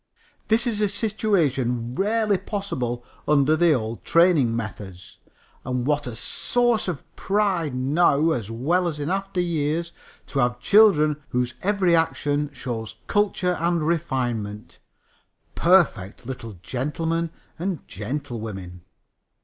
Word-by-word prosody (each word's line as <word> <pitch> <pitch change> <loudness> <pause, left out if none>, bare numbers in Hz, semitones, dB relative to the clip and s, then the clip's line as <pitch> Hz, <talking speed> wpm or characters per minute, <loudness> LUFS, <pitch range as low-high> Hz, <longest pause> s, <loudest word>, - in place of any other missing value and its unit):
This 230 +2 +3
is 220 -3 -1
a 210 - +2
situation 150 - 0
rarely 210 - +1
possible 130 - -3 0.2
under 150 +1 +4
the 170 0 +4
old 115 -3 -3
training 165 -9 +4
methods. 100 -5 -7 0.4
And 125 -1 -2
what 145 -1 0
a 120 - -5
source 240 - +1
of 170 -6 -3
pride 190 -8 0
now 145 +4 +3
as 115 -8 -2
well 160 +11 +1
as 155 -3 -4
in 145 +4 -2
after 195 -1 -2
years! 170 -1 -1 0.3
To 140 - -3
have 120 -1 +1
children 155 - +5
whose 125 0 -1
every 190 -3 +2
action 150 -3 0
shows 125 -4 -5
culture 195 -3 +1
and 170 -1 +1
refinement 125 -10 -2 0.7
perfect 160 - +2
little 115 -3 -6
gentlemen 160 - -2 0.3
and 180 -1 -3
gentlewomen." 105 -6 -6
150 Hz, 120 wpm, -24 LUFS, 125-180 Hz, 0.7 s, children